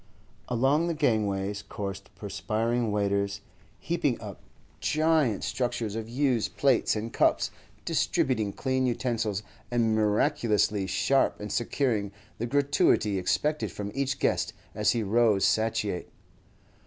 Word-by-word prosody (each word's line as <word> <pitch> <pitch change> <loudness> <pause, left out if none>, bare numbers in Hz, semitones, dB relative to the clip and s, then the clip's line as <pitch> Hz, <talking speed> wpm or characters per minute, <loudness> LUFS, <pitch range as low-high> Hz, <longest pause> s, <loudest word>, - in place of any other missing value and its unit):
Along 135 +7 +2
the 170 - -1
gangways 105 -7 0
coursed 100 -1 -6
perspiring 115 +1 -1
waiters, 100 0 0 0.4
heaping 165 -7 -1
up 105 -3 -9 0.4
giant 155 -8 +2
structures 120 -4 -2
of 115 0 -5
used 125 -2 0
plates 135 -5 +3
and 110 +2 -4
cups, - - +2 0.3
distributing 110 -6 +1
clean 130 +4 0
utensils, 115 -4 -1 0.3
and 115 -2 +2
miraculously 105 -2 +2
sharp 135 +9 +2
in 105 0 -6
securing 115 -4 0 0.3
the 120 - -1
gratuity 135 -7 +2
expected 150 +11 0
from 100 0 -5
each 140 0 -1
guest - - 0 0.2
as - - +2
he 115 -2 0
rose 110 -1 +3
satiate. 110 -4 0
115 Hz, 115 wpm, -28 LUFS, 105-130 Hz, 0.4 s, plates